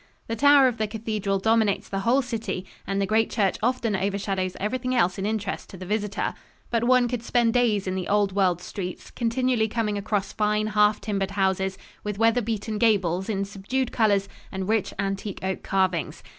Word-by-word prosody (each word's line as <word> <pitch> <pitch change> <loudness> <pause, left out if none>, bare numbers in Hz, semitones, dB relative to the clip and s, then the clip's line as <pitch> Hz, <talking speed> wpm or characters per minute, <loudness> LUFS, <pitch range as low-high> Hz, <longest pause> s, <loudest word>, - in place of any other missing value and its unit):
The 230 - -2
tower 285 +2 +6
of 245 -2 -1
the 215 - +1
cathedral 210 -2 -2
dominates 220 0 +2
the 195 - -3
whole 245 +7 +2
city 225 -6 -4 0.2
and 195 0 -1
the 200 - +2
great 220 +2 +2
church 200 -4 +1
often 245 -4 +1
overshadows 195 -1 -1
everything 255 +5 -1
else 185 -5 +2
in 195 - -1
interest 210 -3 -3
to 190 - -10
the 185 - -8
visitor. 210 +1 -1 0.4
But 235 0 +1
one 250 0 +4
could 245 -1 -3
spend 235 -1 +2
days 225 -5 +2
in 185 - -2
the 185 -1 -3
old 205 -1 +2
world 180 -3 +2
streets, 180 -1 -6
continually 240 -1 +1
coming 215 -2 -1
across 200 -1 -2
fine 210 0 +1
half 210 0 +3
timbered 195 -3 -1
houses, 190 0 +1 0.3
with 210 -1 -3
weather 230 +2 +3
beaten 220 -1 -3
gables 190 -4 +2
in 200 -2 -1
subdued 205 +6 -2
colors 200 -4 +2 0.2
and 190 -1 -4
rich 220 -2 +1
antique 195 0 -3
oak 190 0 -2
carvings. 185 -4 -1
210 Hz, 185 wpm, -25 LUFS, 195-230 Hz, 0.4 s, tower